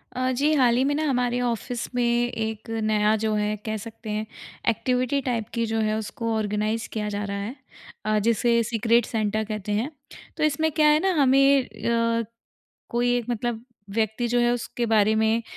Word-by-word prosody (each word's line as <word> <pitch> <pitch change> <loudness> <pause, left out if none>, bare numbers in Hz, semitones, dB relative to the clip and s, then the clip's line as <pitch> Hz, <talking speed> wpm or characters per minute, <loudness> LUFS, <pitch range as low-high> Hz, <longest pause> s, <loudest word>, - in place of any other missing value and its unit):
अ, 255 0 0
जी, 285 +5 +1
हाल 250 -5 +4
ही 260 - +3
में 285 - +1
ना 310 - 0
हमारे 245 -2 +1
ऑफ़िस 240 0 -2
में 245 - +2
एक 235 -2 -1
नया 215 0 +3
जो 220 0 -1
है 210 0 0
कह 215 0 -2
सकते 225 -1 -9
हैं 215 +1 -2 0.4
एक्टिविटी 250 +4 0
टाइप 240 -4 -2
की 230 -1 0
जो 225 0 -1
है 215 0 +1
उसको 225 +2 -3
ऑर्गेनाइज़ 215 +1 -1
किया 210 -1 -2
जा 205 0 -3
रहा 200 0 -3
है। 205 +6 -5 0.5
अ, 215 0 +2
जिसे 235 +2 +2
सीक्रेट 230 +1 +2
सेंटा 215 -1 -1
कहते 215 -1 -5
हैं। 220 +7 0 0.5
तो - - -1
इसमें 310 +1 +2
क्या 305 0 +3
है 300 0 +5
ना 385 - +3
हमें 275 0 +5
अ, 230 -1 0 0.7
कोई 240 +1 +1
एक 240 -2 -3
मतलब 235 0 -2 0.3
व्यक्ति 220 +2 0
जो 245 +1 +1
है 240 0 +3
उसके 240 0 -3
बारे 215 -1 +3
में 220 +1 +2
230 Hz, 190 wpm, -25 LUFS, 215-245 Hz, 0.7 s, है